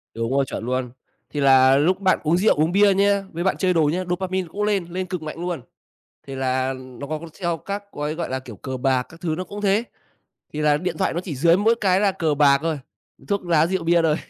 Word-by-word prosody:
Đúng 115 +2 -2
rồi, 135 0 +2
chuẩn 115 - -6
luôn. 125 -1 -2 0.4
Thì 145 - -4
là 135 -1 +6
lúc 175 +7 +2
bạn 190 -1 +2
uống 165 +3 +2
rượu, 210 +4 +3
uống 155 +3 +1
bia 200 +1 +5
nha, 200 0 +2
với 170 +2 -4
bạn 190 - +1
chơi 185 -2 +1
đồ 165 - +3
nhá, 185 +1 -1
dopamine 185 0 -2
cũng 210 +3 -3
lên, 205 -4 +1
lên 185 +2 -4
cực 180 -2 -5
mạnh 155 +1 -7
luôn. 175 -5 -3 0.7
Thì 135 - -6
là 130 0 0
nó 130 +1 -9
có 155 +1 -3
có 170 - -9 0.2
theo 170 -2 0
các 200 +5 -5
gói, 150 +1 -3
gọi 170 - -4
là, 130 - -2
kiểu, 125 -4 -11
cờ 130 +6 -6
bạc 130 0 +1
các 165 +1 -16
thứ 160 -3 -1
nó 185 - -3
cũng 205 +2 -8
thế. 205 +3 +2 0.7
Thì 150 - -4
là 150 -1 +3
điện 175 +1 -3
thoại - - +1
nó 170 - -1
chỉ 180 -4 -6
dưới 170 +5 +4
mỗi 220 +4 +3
cái 190 -2 +3
là 200 -1 +2
cờ 165 -5 0
bạc 140 -1 +5
thôi, 160 -2 -1 0.5
thuốc 200 -2 -1
lá 165 -2 +3
rượu 185 -1 -2
bia 170 0 +3
thôi. 155 -2 +2
165 Hz, 255 wpm, -22 LUFS, 140-185 Hz, 0.7 s, là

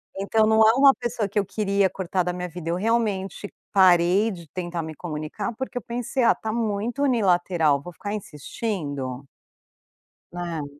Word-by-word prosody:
Então 200 +3 +2
não 220 0 +4
é 225 - +6
uma 275 +1 +7
pessoa 240 -3 -2
que 205 - -6
eu 205 - +2
queria 200 -1 +1
cortar 185 -1 -2
da 180 - -1
minha 180 0 -4
vida. 170 -1 -7
Eu 170 - +1
realmente 205 -2 -1 0.2
parei 185 +3 +5
de 170 -4 -9
tentar 175 -2 -3
me 160 -1 -7
comunicar, 155 +5 -5
porque 265 -1 -5
eu - - -2
pensei: 245 +2 -2
"Ah, - - +6
tá 220 -1 -4
muito 230 +3 -2
unilateral. 175 - +2
Vou 175 - -9
ficar 205 +4 -6
insistindo?". 145 - -5 1.1
Né? 170 -3 -4
190 Hz, 165 wpm, -24 LUFS, 170-220 Hz, 1.1 s, uma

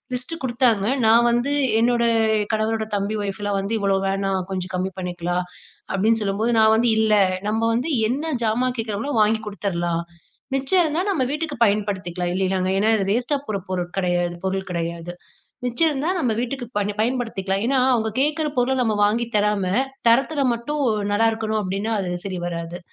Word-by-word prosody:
List 325 +7 -6
குடுத்தாங்க. 240 -5 +2 0.2
நான் 235 +2 +5
வந்து 240 +5 +1 0.3
என்னோட 240 0 +2 0.5
கணவரோட 220 0 0
தம்பி 200 +2 -2
ஒய்ஃப்லாம் 200 0 -2
வந்து, 205 +4 -2
"இவ்ளோ 195 -1 +2
வேணா 195 0 -1 0.2
கொஞ்சம் 185 0 -4
கம்மி 185 +1 -1
பண்ணிக்கலாம்" 175 0 -2 0.5
அப்டின்னு 220 +4 +2
சொல்லும்போது. 210 +4 0
நான் 220 0 +6
வந்து, 235 +2 +2
"இல்ல, 220 -1 +3 0.3
நம்ம 220 +2 0
வந்து 255 +8 -1 0.2
என்ன 295 +7 -2
ஜாமான் 245 +3 +1
கேக்குறாங்களோ 225 +5 -3
வாங்கி 220 +1 +3
குடுத்தறலாம். 175 -5 -2 0.5
மிச்சம் 275 +7 +2
இருந்தா 315 +2 0
நம்ம 290 -9 +1
வீட்டுக்கு 305 0 -3
பயன்படுத்திக்கலாம்" 190 -4 -1
இல்லையாங்க, 185 -1 0
ஏன்னா 215 +3 +2
இது 200 - 0
வேஸ்ட்டா 250 +6 +1
போற 210 -2 -1
பொருள் 180 -2 -2
கிடையாது 175 -2 0
பொருள் 190 0 -2
கிடையாது, 170 0 -4 0.5
மிச்சம் 245 +7 +2
இருந்தா 290 +4 -1
நம்ம 250 -8 +1
வீட்டுக்கு 250 0 -4
பணி 205 0 -1
பயன்படுத்திக்கலாம். 220 -5 -1
ஏன்னா 270 -1 +2
அவங்க 220 -2 +1
கேக்கற 305 +2 +1
பொருள 250 +2 +2
நம்ம 220 -3 +1
வாங்கி 230 +3 0
தராம, 210 -2 +2 0.4
தரத்துல 275 +4 +2
மட்டும் 290 +6 -3 0.3
நல்லாருக்கணும் 220 0 +1
அப்டின்னா 200 +4 -2
அது 180 -1 -3
சரி 185 -2 -4
வராது. 170 0 -5
215 Hz, 155 wpm, -22 LUFS, 190-245 Hz, 0.5 s, நான்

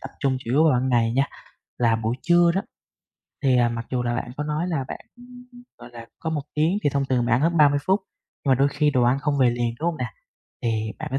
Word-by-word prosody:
tập 135 - -8
trung 135 -1 +1
chủ 115 - -7
yếu 145 +5 +4
vào 155 - +5
ban 125 +1 +1
ngày 115 -2 +2
nha. 135 +2 +1 0.5
Là 115 -2 +3
buổi 115 +1 -2
trưa 175 0 +4
đó, 195 - +1 0.8
thì, 130 -2 +3
à, 120 -1 +3
mặc 115 0 -5
dù 125 -1 -1
là 120 0 -1
bạn 120 0 -4
có 150 - -3
nói 150 +3 -2
là 155 -6 -1
bạn, - - -6 0.8
gọi - - -12
là, 115 -1 -10
có 160 - -4
1 150 -3 -2
tiếng 160 +6 +1
thì 145 - +2
thông 140 0 0
thường 125 -3 0
bạn 120 - 0
ăn 120 - +2
hết 165 +3 +1
30 145 -1 +5
phút, 190 +2 +3 0.5
mà 135 - +5
đôi 140 +2 +3
khi 150 +1 +1
đồ 130 -3 +2
ăn 125 +3 +3
không 145 0 -1
về 125 -2 +4
liền, 120 -1 -2
đúng 165 - -1
hông 170 - -3
nè? - - -3 0.5
Thì 110 -2 -1
bạn - - -5
có 135 - +1
135 Hz, 265 wpm, -23 LUFS, 120-150 Hz, 0.8 s, vào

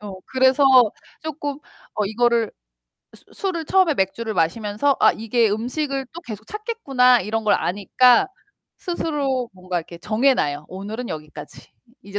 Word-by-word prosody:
어. 205 -1 -8
그래서 260 +2 +3 0.6
쪼끔 290 -2 -4 0.4
어 210 - 0
이거를 230 +2 +1 0.6
수 - - -18
술을 370 -5 -3
처음에 375 -2 +3
맥주를 220 +2 -2
마시면서 210 - 0
'아, - - +6
이게 225 0 +1
음식을 270 +5 -2
또 345 - -8
계속 220 -6 -9
찾겠구나.' 275 - +2
이런 220 +3 -3
걸 210 - +3
아니까 235 - +3 0.5
스스로 280 -8 -2
뭔가 185 -1 -5
이렇게 170 +1 -9
정해 220 +10 +2
놔요. 145 - -2
'오늘은 210 +6 -6
여기까지. 150 -1 -9 0.3
이제 200 +1 -5
235 Hz, 310 characters per minute, -22 LUFS, 205-275 Hz, 0.6 s, 아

